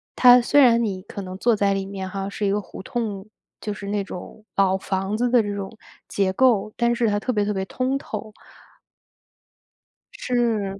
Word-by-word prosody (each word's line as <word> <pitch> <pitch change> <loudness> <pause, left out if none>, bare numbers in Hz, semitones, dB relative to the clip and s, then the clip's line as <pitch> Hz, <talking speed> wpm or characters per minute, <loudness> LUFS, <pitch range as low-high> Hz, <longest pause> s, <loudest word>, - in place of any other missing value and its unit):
它 250 -1 +8
虽 285 +4 +4
然 235 -2 +5
你 190 -4 -2
可 205 - -7
能 185 0 -7
坐 235 +2 +2
在 200 -1 +2
里 195 0 -2
面 190 -1 -6
哈， 195 -1 -4
是 205 +1 -3
一 195 - +2
个 205 - +1
胡 190 -1 -10
同， 215 -4 -4 0.3
就 210 - -3
是 200 -1 -8
那 205 -1 -1
种， 190 +3 -9
老 190 -1 +3
房 190 +1 -2
子 245 +2 +1
的 245 -2 +5
这 205 -1 -3
种 195 +1 -5 0.4
结 190 -2 0
构， 215 -3 +2
但 240 0 +2
是 235 -1 +1
它 205 - +1
特 255 - -2
别 210 -3 0
特 210 - -1
别 190 -1 -2
通 260 +6 -1
透。 215 -4 -7 1.8
是， 220 -6 -1
205 Hz, 210 characters per minute, -23 LUFS, 195-235 Hz, 1.8 s, 它